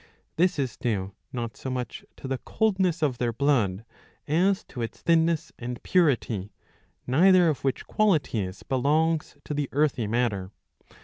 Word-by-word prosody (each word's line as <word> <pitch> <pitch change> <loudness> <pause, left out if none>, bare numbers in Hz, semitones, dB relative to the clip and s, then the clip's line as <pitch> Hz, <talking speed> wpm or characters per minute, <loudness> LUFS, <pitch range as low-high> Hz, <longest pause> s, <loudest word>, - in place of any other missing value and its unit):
This 180 +1 +2
is 130 -5 -2
due 100 -6 -2 0.2
not 120 -4 -4
so 130 - -6
much 125 -2 -4
to - - -8
the 135 -1 -2
coldness 190 -6 0
of 130 -5 0
their 120 -1 +1
blood 115 -6 +1 0.4
as 185 +6 +2
to 120 - -8
its 115 - -5
thinness 165 -1 +2
and 120 0 -6
purity; 120 - +1 0.6
neither 180 +7 +5
of 150 - -2
which 135 -1 -1
qualities 120 - 0
belongs 150 +4 +1
to - - -4
the 145 -2 -2
earthy 140 -6 +1
matter. 105 -5 0
135 Hz, 145 wpm, -26 LUFS, 115-165 Hz, 0.6 s, neither